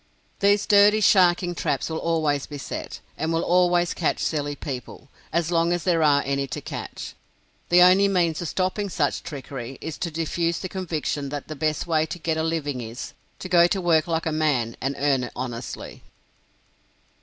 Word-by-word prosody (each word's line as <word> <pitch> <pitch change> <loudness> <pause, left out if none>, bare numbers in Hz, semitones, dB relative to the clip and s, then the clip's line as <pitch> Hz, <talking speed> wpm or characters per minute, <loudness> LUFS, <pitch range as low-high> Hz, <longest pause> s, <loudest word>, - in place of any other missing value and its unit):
These 200 0 +3
dirty 205 0 +6
sharking 180 -3 +4
traps 140 -5 -1
will 160 -1 -3
always 155 -4 0
be 145 - -7
set, 135 - -6 0.2
and 160 +1 -1
will 165 0 0
always 175 -1 +3
catch 165 - 0
silly 145 -2 -2
people, 135 -1 -7 0.2
as 170 0 0
long 170 0 +2
as 175 -1 -1
there 170 -3 +2
are 145 -2 +4
any 140 0 -1
to 120 - -5
catch. - - -7 0.6
The 180 +1 +7
only 185 +2 +6
means 175 -5 +1
of 170 - -3
stopping 190 +4 -1
such 150 -6 0
trickery 135 -3 -7
is 160 -1 -6
to 170 - -2
diffuse 165 +1 -1
the 185 - -5
conviction 160 -6 -3
that 145 +1 -6
the 155 - -5
best 155 +1 -1
way 160 -2 +1
to - - -5
get 160 -1 -1
a 160 - -1
living 155 -5 -2
is, 115 +2 -7 0.2
to - - -7
go 175 -2 +5
to 195 +2 -1
work 170 -2 +2
like 165 -1 -1
a 160 - 0
man 145 -7 0
and 135 +2 -1
earn 135 -3 +1
it - - -10
honestly. 120 -2 -6
160 Hz, 190 wpm, -24 LUFS, 145-175 Hz, 0.6 s, The